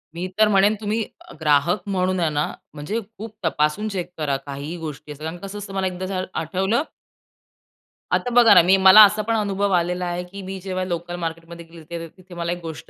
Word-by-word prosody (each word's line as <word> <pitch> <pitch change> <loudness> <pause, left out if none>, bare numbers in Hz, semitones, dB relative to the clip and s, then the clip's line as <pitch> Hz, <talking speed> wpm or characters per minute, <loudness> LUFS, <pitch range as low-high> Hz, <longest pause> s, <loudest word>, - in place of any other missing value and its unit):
मी 175 +2 -3
तर 215 - +6
म्हणेन 200 +1 +4
तुम्ही 215 +2 -1 0.4
ग्राहक 155 +5 +2
म्हणून 185 -1 0
आहे 165 -2 +1
ना 150 0 -1 0.2
म्हणजे, 155 +10 -3 0.2
खूप 220 +1 -8
तपासून 155 +7 0
चेक 180 -3 -4
करा 145 -3 -1
काहीही 140 +4 -6
गोष्टी 150 -2 -7
कारण 160 +4 -6
कसं 195 +3 -8
असतं 200 -1 -8
मला 190 -1 0
एकदा 185 0 -5
झालं 185 -1 -3
आठवलं 190 - 0 1.3
आता 245 - +1
बघा 235 -3 +8
ना, - - +8
मी 185 +3 +5
मला 190 +3 +10
असा 215 +1 +1
पण 225 +2 -1
अनुभव 200 -1 0
आलेला 180 +1 -1
आहे, 175 0 -3
की 195 +3 -10
मी 190 0 -6
जेव्हा 185 0 -3
लोकलमार्केटमध्ये 170 -1 -5
गेली, 165 0 -9
तिथे 185 -1 -15
मला 170 0 -2
एक 175 - -3
गोष्ट 160 -2 -8
180 Hz, 190 wpm, -22 LUFS, 165-195 Hz, 1.3 s, मला